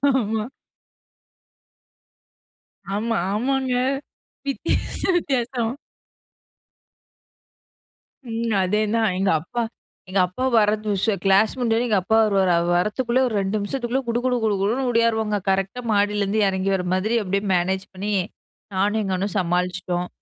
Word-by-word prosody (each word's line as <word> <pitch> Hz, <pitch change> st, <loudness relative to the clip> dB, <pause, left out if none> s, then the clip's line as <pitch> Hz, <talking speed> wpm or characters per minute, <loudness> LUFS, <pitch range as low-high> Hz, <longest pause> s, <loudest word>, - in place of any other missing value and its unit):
ஆமா. 220 Hz, -3 st, 0 dB, 2.5 s
ஆமா 225 Hz, +2 st, -1 dB, 0.2 s
ஆமாங்க 260 Hz, +4 st, 0 dB, 0.7 s
வித்தியாசம் 315 Hz, +6 st, -1 dB
வித்தியாசமா. 245 Hz, -5 st, -1 dB, 2.5 s
ம். 230 Hz, 0 st, -1 dB
அதேதான் 215 Hz, +4 st, +1 dB
எங்க 195 Hz, 0 st, +2 dB
அப்பா 235 Hz, +8 st, -3 dB, 0.5 s
எங்க 190 Hz, +1 st, +1 dB
அப்பா 180 Hz, +8 st, -5 dB, 0.2 s
வரது 215 Hz, 0 st, +1 dB
உஷ 195 Hz, -, -1 dB, 0.2 s
கிளாஸ் 195 Hz, +2 st, +4 dB
முடிஞ்சோடனே 235 Hz, -1 st, +1 dB
எங்க 215 Hz, -3 st, +2 dB
அப்பா 220 Hz, +4 st, +2 dB
வருவாரு, 195 Hz, -4 st, +2 dB
அவர் 175 Hz, +1 st, +1 dB
வரத்துக்குள்ளேயே 235 Hz, +7 st, +1 dB
ஒரு 230 Hz, -, -3 dB
2 195 Hz, +2 st, -1 dB
நிமிஷத்துக்குள்ளே 240 Hz, +4 st, -2 dB
குடு 235 Hz, 0 st, 0 dB
குடு 250 Hz, -1 st, +2 dB
குடு 210 Hz, -2 st, +2 dB
குடுன்னு 235 Hz, +7 st, 0 dB
ஓடியாருவங்க. 225 Hz, -2 st, +2 dB
கரெக்ட்டா 195 Hz, +5 st, 0 dB
மாடியிலேருந்து 205 Hz, 0 st, +1 dB
எறங்கி 190 Hz, 0 st, 0 dB
வர 180 Hz, -1 st, -2 dB
மாதிரி, 210 Hz, +5 st, 0 dB
அப்டியே 200 Hz, +1 st, -1 dB
மேனேஜ் 190 Hz, +2 st, 0 dB
பண்ணி, 200 Hz, +3 st, -3 dB, 0.6 s
நானும் 205 Hz, +3 st, +1 dB
எங்க 195 Hz, -2 st, -2 dB
அண்ணனும் 195 Hz, +2 st, -3 dB
சமாளிச்சுட்டோம். 180 Hz, 0 st, -1 dB
210 Hz, 120 wpm, -23 LUFS, 190-235 Hz, 2.5 s, கிளாஸ்